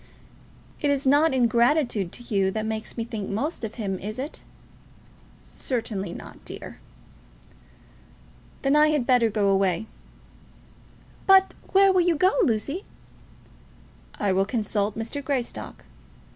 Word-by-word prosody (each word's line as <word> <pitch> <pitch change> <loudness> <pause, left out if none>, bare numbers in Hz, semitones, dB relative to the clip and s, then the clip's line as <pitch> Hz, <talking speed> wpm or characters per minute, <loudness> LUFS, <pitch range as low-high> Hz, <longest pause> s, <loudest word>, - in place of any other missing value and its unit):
"It 290 - 0
is 280 -1 +1
not 290 +4 +4
ingratitude 240 - +2
to 240 - -9
you 195 -4 +1
that 215 +2 -3
makes 220 +1 -4
me 230 - -1
think 220 -3 -5
most 255 +8 -3
of 220 0 -5
him; 195 -5 -3
is 215 +3 -6
it?" 275 +4 -6 1.0
"Certainly 220 -7 -3
not, - - -11
dear." - - -9 1.8
"Then 275 +1 +3
I 300 0 +6
had 300 -5 +1
better 245 -3 +4
go 205 -2 +1
away." 195 0 +1 1.4
"But 385 0 +6 0.2
where 390 0 +6
will 370 - +4
you 345 -1 +2
go, 370 +5 +4
Lucy?" 285 - 0 1.3
"I 205 -2 0
will 190 +1 +2
consult 210 -1 -1
Mr. 230 +6 -4
Greystock." 260 -3 -4
235 Hz, 130 wpm, -25 LUFS, 210-285 Hz, 1.8 s, I